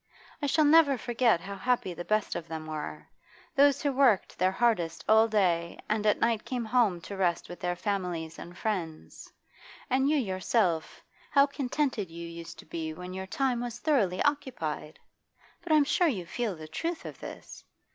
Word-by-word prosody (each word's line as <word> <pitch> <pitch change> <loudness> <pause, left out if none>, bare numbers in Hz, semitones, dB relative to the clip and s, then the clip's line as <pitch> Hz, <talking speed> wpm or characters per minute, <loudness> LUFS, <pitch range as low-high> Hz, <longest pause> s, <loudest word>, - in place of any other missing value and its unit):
I 290 - 0
shall 310 +2 +3
never 295 -3 +6
forget 235 -5 +2
how 200 +1 -6
happy 245 -3 0
the 175 - -6
best 215 +2 0
of 165 - -5
them 160 -1 -6
were, 155 -1 -6 0.5
those 280 -1 +4
who 285 - +2
worked 255 -7 +3
their 185 +1 +4
hardest 175 -9 0
all 220 +1 +6
day 175 -6 +1
and 215 0 0
at 210 - +3
night 230 -2 +1
came 245 -3 -3
home 220 -6 +2
to 200 - -7
rest 180 -3 0
with 175 - -9
their 175 0 -1
families 180 -4 -3
and 175 +1 -10
friends. 175 -8 -4 0.6
And 265 +2 +3
you 305 - +3
yourself, 185 - 0 0.3
how 280 -1 +6
contented 275 - -2
you 170 +1 -7
used 170 0 -9
to - - -12
be 160 0 -5
when 180 +2 -7
your 190 0 -5
time 250 +2 0
was 240 -1 -4
thoroughly 240 - +1
occupied! 255 - -2 0.6
But 340 -1 -5
I'm 305 -1 +6
sure 345 +5 +2
you 200 - -1
feel 220 +1 -2
the 155 -1 -9
truth 330 - -4
of - - -8
this. - - -9
210 Hz, 180 wpm, -29 LUFS, 175-255 Hz, 0.6 s, never